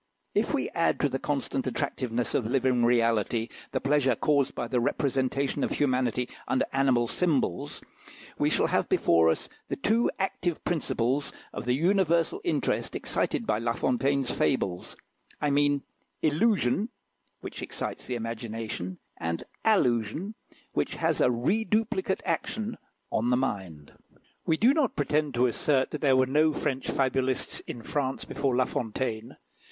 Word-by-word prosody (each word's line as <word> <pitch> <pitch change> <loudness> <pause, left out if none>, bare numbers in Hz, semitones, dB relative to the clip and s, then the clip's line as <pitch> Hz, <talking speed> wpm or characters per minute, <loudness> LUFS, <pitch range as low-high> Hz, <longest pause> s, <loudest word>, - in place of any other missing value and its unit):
If - - +1
we - - -1
add - - +1
to - - +3
the - - -2
constant - - -2
attractiveness 120 -1 -1
of 120 - +1
living 130 -2 +2
reality 115 -1 +2 0.2
the - - 0
pleasure 135 -3 +2
caused 140 +2 +1
by 120 - -3
the 125 +1 +1
representation 135 +2 0
of - - +1
humanity 125 -3 +1 0.2
under 130 - +1
animal 130 -3 +3
symbols, 135 - 0 0.6
we - - +3
shall - - +2
have - - +1
before 80 -1 +4
us 80 - 0 0.2
the - - -2
two 225 +10 +2
active 180 -3 -2
principles 140 -4 0 0.2
of - - -5
the 125 0 +2
universal 170 0 +2
interest 150 - 0
excited 115 - -1
by 105 -1 +1
La 115 0 0
Fontaine's 135 +1 +1
fables 95 -9 -1 0.4
I 150 - +1
mean 145 0 +2 0.4
illusion, 185 - +2 0.5
which - - -7
excites - - -5
the 125 - -2
imagination; 115 -5 -4 0.2
and 85 0 -3 0.2
allusion, 155 - +2 0.4
which - - -1
has - - +1
a - - +5
reduplicate 190 - 0
action 215 +6 -2 0.4
on 115 +2 +1
the 125 - +3
mind. 95 - -3 0.5
We 160 - +3
do 240 +9 +5
not 295 -6 +1
pretend 150 -1 0
to 125 +1 +4
assert 130 +2 +1
that 150 - -4
there 135 -4 +4
were 130 - +5
no 150 +4 +3
French 135 -3 -2
fabulists 130 -1 +1
in 115 - -6
France 135 0 -2
before 135 -3 -1
La 130 0 +3
Fontaine. 115 -1 -3
130 Hz, 145 wpm, -28 LUFS, 120-150 Hz, 0.6 s, a